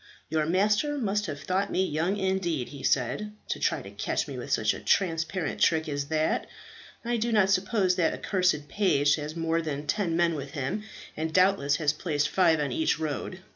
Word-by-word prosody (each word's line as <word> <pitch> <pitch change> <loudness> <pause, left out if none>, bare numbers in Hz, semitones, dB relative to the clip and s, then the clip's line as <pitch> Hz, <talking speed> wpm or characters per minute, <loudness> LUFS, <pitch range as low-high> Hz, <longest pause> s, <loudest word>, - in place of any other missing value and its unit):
"Your 155 0 0
master 210 - +2
must 210 -4 -1
have 145 -3 -5
thought 190 +6 -1
me 190 - +2
young 170 +4 -1
indeed," 190 -8 -1
he 140 -2 -9
said, 140 - 0 0.2
"to - - -2
try - - 0
and - - -11
catch - - -1
me - - -6
with - - -6
such - - +2
a - - -7
transparent 165 -3 0
trick 160 -1 +3
as 145 -1 -2
that. 155 +1 0 0.6
I 240 0 0
do 230 +1 -1
not 205 -3 +4
suppose 190 -1 +2
that 165 -3 +3
accursed 180 -7 0
page 145 -9 +2
has 150 +1 -5
more 165 0 0
than 150 -2 -4
ten 170 0 0
men 170 -1 +3
with 140 -2 -6
him, 140 +8 -2 0.3
and 160 +1 -3
doubtless 185 -5 +3
has 150 -1 +1
placed 150 -2 -1
five 170 -4 +3
on 145 -3 -1
each 160 +5 +1
road. 160 +4 -4
165 Hz, 195 wpm, -27 LUFS, 150-190 Hz, 0.6 s, not